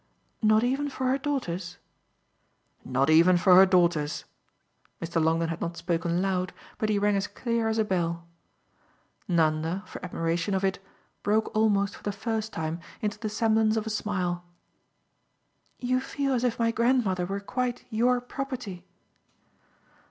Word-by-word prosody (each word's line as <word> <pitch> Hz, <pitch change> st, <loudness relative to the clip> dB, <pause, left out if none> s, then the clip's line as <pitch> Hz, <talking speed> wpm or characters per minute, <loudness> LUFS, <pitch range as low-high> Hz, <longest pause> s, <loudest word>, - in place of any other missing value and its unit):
"Not 215 Hz, 0 st, +4 dB
even 270 Hz, +4 st, 0 dB
for 260 Hz, -1 st, -4 dB
her 265 Hz, +2 st, +1 dB
daughter's?" 185 Hz, -, -3 dB, 1.1 s
"Not 135 Hz, +4 st, +1 dB
even 170 Hz, +3 st, +6 dB
for 180 Hz, +1 st, +5 dB
her 190 Hz, +1 st, +9 dB
daughter's." 170 Hz, -5 st, +2 dB, 0.7 s
Mr. 165 Hz, -1 st, -1 dB
Longdon 165 Hz, +1 st, +2 dB
had 165 Hz, -, -4 dB
not 170 Hz, 0 st, -3 dB
spoken 170 Hz, +1 st, 0 dB
loud, 185 Hz, -1 st, -1 dB, 0.3 s
but 215 Hz, -, 0 dB
he 210 Hz, -, +2 dB
rang 205 Hz, 0 st, +2 dB
as 200 Hz, +1 st, 0 dB
clear 230 Hz, -2 st, -1 dB
as 220 Hz, 0 st, 0 dB
a 220 Hz, -, +2 dB
bell. 170 Hz, -3 st, -1 dB, 1.0 s
Nanda, 165 Hz, +2 st, +1 dB
for -, -, -10 dB
admiration 170 Hz, +2 st, -1 dB
of 190 Hz, -, -1 dB
it, 190 Hz, -1 st, 0 dB, 0.4 s
broke 215 Hz, +2 st, 0 dB
almost 205 Hz, -2 st, +2 dB
for -, -, -14 dB
the 205 Hz, -, -2 dB
first 220 Hz, +1 st, -3 dB
time 160 Hz, +1 st, -3 dB, 0.2 s
into 210 Hz, 0 st, -2 dB
the 215 Hz, -1 st, -3 dB
semblance 220 Hz, 0 st, +2 dB
of 220 Hz, -, -1 dB
a 220 Hz, -, -3 dB
smile. 185 Hz, -5 st, -2 dB, 1.3 s
"You 255 Hz, 0 st, 0 dB
feel 275 Hz, +1 st, -2 dB
as 245 Hz, -1 st, 0 dB
if 245 Hz, -2 st, +1 dB
my 230 Hz, -1 st, +2 dB
grandmother 230 Hz, -7 st, +1 dB
were 195 Hz, +1 st, -2 dB
quite 250 Hz, +4 st, -3 dB
YOUR 245 Hz, +3 st, +2 dB
property!" 245 Hz, -8 st, -6 dB
200 Hz, 150 wpm, -27 LUFS, 175-230 Hz, 1.3 s, her